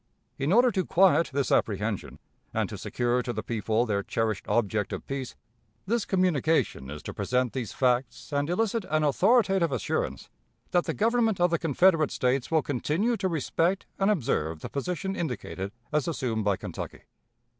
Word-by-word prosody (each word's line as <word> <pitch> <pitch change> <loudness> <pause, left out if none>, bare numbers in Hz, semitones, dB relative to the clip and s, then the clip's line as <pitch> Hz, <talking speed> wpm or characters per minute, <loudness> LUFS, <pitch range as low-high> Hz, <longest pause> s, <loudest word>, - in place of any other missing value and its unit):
In 140 +4 0
order 245 +4 +5
to 190 -3 0
quiet 180 -1 +4
this 140 -1 -1
apprehension, 105 -1 0 0.4
and - - +1
to - - -6
secure 120 0 0
to 125 - -3
the 110 -2 -4
people 110 +1 0
their 100 -3 0
cherished 110 0 -2
object 105 -1 0
of - - -5
peace, 135 -2 -5 0.5
this 225 +2 0
communication 165 - +1
is 75 +1 -7
to - - -6
present 125 +4 0
these 125 -4 -3
facts 125 +1 0
and 145 +2 0
elicit 225 +4 0
an 155 0 +2
authoritative 190 - +3
assurance 130 - -2 0.4
that 175 -1 +2
the - - -2
Government 225 -2 +2
of 175 0 +3
the 170 - +1
Confederate 165 0 +3
States 130 0 0
will 160 -2 +2
continue 155 - 0
to 190 - 0
respect 170 +3 0
and 195 +1 +3
observe 100 - 0
the - - -6
position 180 +6 -3
indicated 115 - -4 0.2
as 150 -3 +1
assumed 125 -9 -1
by 100 -2 +1
Kentucky. - - -7
145 Hz, 165 wpm, -27 LUFS, 120-185 Hz, 0.5 s, order